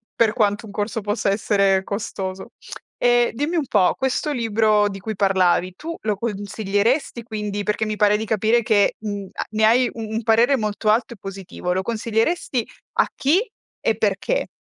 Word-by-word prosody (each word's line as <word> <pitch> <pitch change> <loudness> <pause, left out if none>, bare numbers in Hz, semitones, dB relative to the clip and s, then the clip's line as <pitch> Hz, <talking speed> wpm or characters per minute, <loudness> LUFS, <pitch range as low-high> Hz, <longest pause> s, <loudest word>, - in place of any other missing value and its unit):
per 225 -2 +3
quanto 210 -2 +1
un 210 - -10
corso 210 +2 -3
possa 205 0 -1
essere 195 -1 +2
costoso. 195 -2 -5 0.5
E 240 0 +4
dimmi 290 +8 -2
un 315 -4 +1
po', 185 -7 +3
questo 265 +3 -1
libro 215 -3 +2
di 195 -1 -7
cui 215 +3 -5
parlavi 185 -2 +2
tu 330 +2 -6
lo 215 -1 0
consiglieresti, 210 +4 -1
quindi? 210 -2 -4
Perché 210 +1 -1
mi 215 0 -2
pare 210 0 +3
di 220 - -4
capire 220 +2 +2
che, 215 -2 +2
mhmm, 205 -2 -5
a - - -4
ne 220 0 0
hai 245 +3 +4
u - - -11
un 220 +1 -3
parere 230 +5 +4
molto 215 -1 -1
alto 230 +2 +2
e - - -15
positivo. 195 -2 -5
Lo 190 - 0
consiglieresti 230 - -1 0.3
a - - +3
chi, 295 +7 +3 0.4
e - - +1
perché? - - 0
215 Hz, 175 wpm, -22 LUFS, 200-235 Hz, 0.5 s, E